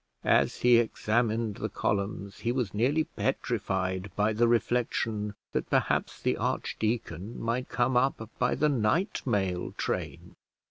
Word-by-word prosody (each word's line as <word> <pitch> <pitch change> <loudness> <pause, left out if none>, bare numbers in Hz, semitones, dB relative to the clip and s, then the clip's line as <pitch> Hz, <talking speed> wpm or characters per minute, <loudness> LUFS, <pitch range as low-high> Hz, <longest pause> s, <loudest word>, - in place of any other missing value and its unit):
As - - +3
he 120 -1 +6
examined 115 -1 0
the - - -3
columns, 100 0 -2
he 120 - 0
was 125 -6 -1
nearly 135 +9 +2
petrified 95 -7 -2
by 105 +1 +2
the 120 +2 +3
reflection 115 -3 0 0.2
that - - -2
perhaps - - +1
the - - 0
archdeacon 110 -2 -2
might 120 +2 -2
come 125 +1 +1
up 125 -3 +1
by 125 0 +2
the 150 - +2
night 140 - +1
mail 95 -6 0
train! - - -3
115 Hz, 135 wpm, -29 LUFS, 105-125 Hz, 0.2 s, he